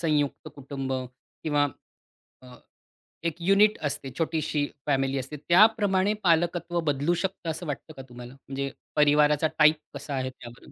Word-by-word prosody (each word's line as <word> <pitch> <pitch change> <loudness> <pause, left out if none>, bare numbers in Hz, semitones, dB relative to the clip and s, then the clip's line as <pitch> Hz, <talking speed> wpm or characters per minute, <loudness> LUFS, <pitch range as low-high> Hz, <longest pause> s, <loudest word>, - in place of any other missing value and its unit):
संयुक्त 150 -4 0
कुटुंब 135 -1 -5 0.5
किंवा 145 -2 +2 0.8
अ, 125 -1 -13 0.7
एक 170 -2 -1
युनिट 200 +4 +4
असते 135 -1 -5
छोटीशी 155 -2 0 0.2
फॅमिली 135 -1 +1
असते. 135 +3 -6
त्याप्रमाणे 200 +3 +4
पालकत्व 175 0 +1
बदलू 145 +5 0
शकतं 185 -3 -3
असं 165 +3 -4
वाटतं 145 +2 -5
का - - -6
तुम्हाला? 120 0 -10
म्हणजे 135 0 -5 0.2
परिवाराचा 150 +1 +4
टाइप 155 0 +7 0.2
कसा 140 0 -6
आहे 130 -1 -2
त्यावरून? 120 -2 -13
150 Hz, 135 wpm, -27 LUFS, 135-170 Hz, 0.8 s, टाइप